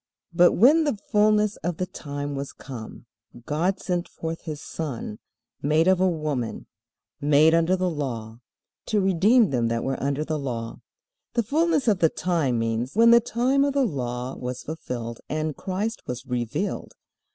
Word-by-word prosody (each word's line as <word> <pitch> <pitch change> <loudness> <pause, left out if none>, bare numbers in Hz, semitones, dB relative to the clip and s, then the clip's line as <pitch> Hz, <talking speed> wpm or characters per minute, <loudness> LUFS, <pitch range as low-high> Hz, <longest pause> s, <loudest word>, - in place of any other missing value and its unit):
But 175 +1 +6
when 290 - +6
the 290 -8 0
fullness 210 0 +3
of 175 0 -3
the 185 - -1
time 145 -5 -6
was 140 0 -5
come, 120 -4 -9 0.4
God 175 +6 0
sent 175 -1 -2
forth 165 0 -6
his 155 -3 -5
Son, 135 -9 -5 0.4
made 155 +4 +2
of 185 -1 +4
a 185 - +4
woman, 150 -8 -3 0.5
made 150 +2 +5
under 165 +2 +3
the 185 0 0
law, 120 -8 -4 0.5
to 215 - +2
redeem 195 - +4
them 120 -3 +1
that 115 0 -1
were 135 0 -2
under 140 +2 -1
the 155 -1 -2
law. 115 -4 -5 0.5
"The 235 - +2
fullness 305 +3 +1
of 205 -5 +3
the 165 - +4
time" 160 -9 0
means 115 - -2
when 230 +1 +6
the 235 - +8
time 255 +5 +1
of 280 -1 +1
the 275 -1 +3
Law 125 - -3
was 125 0 -5
fulfilled 120 -7 -5
and 155 -1 -2
Christ 205 +4 -3
was 125 +1 -5
revealed. 120 -3 -3
160 Hz, 165 wpm, -25 LUFS, 130-195 Hz, 0.5 s, the